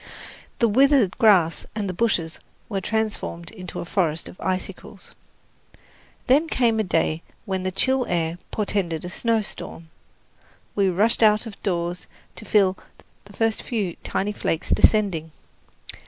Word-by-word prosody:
The 235 - +3
withered 260 -3 +4
grass 190 -8 +4
and 210 -2 -2
the 185 - -3
bushes 175 -6 0 0.3
were 195 -3 -2
transformed 210 -6 -2
into 185 -5 -8
a - - -6
forest 170 -3 0
of - - -12
icicles. 185 0 -5 1.1
Then 285 +6 +4
came 235 -7 +2
a - - +2
day 165 -3 0 0.2
when 190 -1 -2
the 185 0 -2
chill 260 +6 +1
air 170 0 -1
portended 185 -6 -2
a - - -5
snowstorm. 210 -7 -2 0.8
We 195 -2 +3
rushed 210 +7 +2
out 215 +1 +5
of 220 -3 -10
doors 175 -2 -2 0.3
to - - -9
feel 195 -4 +3 0.5
the 205 - -15
first 225 +1 0
few 205 -8 -2
tiny 205 +2 -1
flakes 165 -5 -2
descending. 175 -8 +3
195 Hz, 140 wpm, -23 LUFS, 175-220 Hz, 1.1 s, out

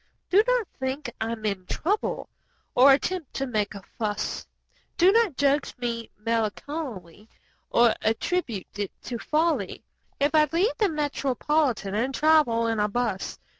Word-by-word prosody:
Do 390 +3 +7
not - - +2
think 265 +2 -3
I 225 +1 -1
am 220 -1 -7
in 200 -3 -2
trouble 405 +6 -1 0.5
or 265 +3 +7
attempt 320 +2 0
to 270 - -1
make 210 -5 -1
a 200 - -9 0.2
fuss; 215 -1 -2 0.5
Do 365 +2 +6
not 440 - +2
judge 285 0 +1
me 235 -2 -3
melancholy 225 - -3 0.4
or 235 -1 +5
attribute 225 - -2
it 200 -2 -2
to 240 -2 -5
folly 320 +5 0 0.4
If 285 +2 +2
I 305 -1 +5
leave 365 +8 +2
the 420 -3 +3
Metropolitan 285 - 0
and 250 +6 -1
travel 300 -7 +4
'n 225 -1 0
a 210 - +2
bus. 210 -3 -2
255 Hz, 145 wpm, -26 LUFS, 220-310 Hz, 0.5 s, Do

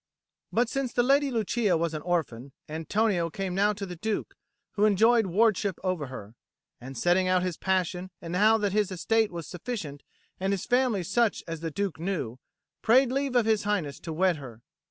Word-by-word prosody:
But 240 +1 +2
since 270 0 -2
the 240 - +3
Lady 280 +2 +3
Lucia 220 -5 +1
was 165 0 -1
an 155 - -4
orphan, 140 -7 -2
Antonio 170 +3 0
came 190 +2 -4
now 200 +3 +3
to 200 0 -5
the 180 -2 -7
Duke, 210 +5 -3 0.4
who 210 0 +2
enjoyed 220 +2 +4
ward 215 +4 +3
ship 200 -4 -2
over 180 -6 -1
her, 110 -5 -9 0.5
and 130 +2 -9
setting 180 +1 +2
out 185 0 +2
his 180 -2 -2
passion 185 0 -1
and 170 +1 -5
how 215 +4 +5
that 205 -2 0
his 210 -1 +1
estate 220 +4 +1
was 170 -2 -6
sufficient 170 - -6 0.4
and 190 +1 0
his 190 - -3
family 245 -6 +2
such 215 +5 +1
as 165 -1 -5
the 165 +1 -3
Duke 185 -1 -3
knew, 160 -10 -3 0.4
prayed 250 +3 +4
leave 275 -1 -1
of 240 -3 +4
His 220 -2 +2
Highness 190 -9 -2
to 165 - -7
wed 175 +1 +2
her. 120 -5 -11
190 Hz, 195 wpm, -27 LUFS, 165-220 Hz, 0.5 s, how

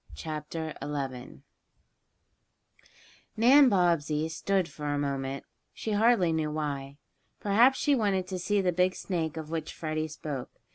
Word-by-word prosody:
CHAPTER 155 0 -5
XI - - -4
DANNY'S 135 -3 -3 0.2
TRICK - - -38 0.5
NAN 260 +4 +7
BOBBSEY 165 -5 +1
stood 185 +3 0
for 150 -3 -7
a 145 0 0
moment, 140 -1 -2 0.3
she 220 - -4
hardly 205 -5 +3
knew 155 -1 0
why. 140 -2 -4 0.4
Perhaps 235 +6 +4
she 290 - +2
wanted 200 -7 +1
to 185 0 -5
see 200 +3 +1
the 180 -1 +2
big 180 +2 +2
snake 165 -4 -3
of 160 0 -6
which 160 -2 -3
Freddie 155 -1 -3
spoke. 150 -4 -6
160 Hz, 145 wpm, -29 LUFS, 150-195 Hz, 0.5 s, NAN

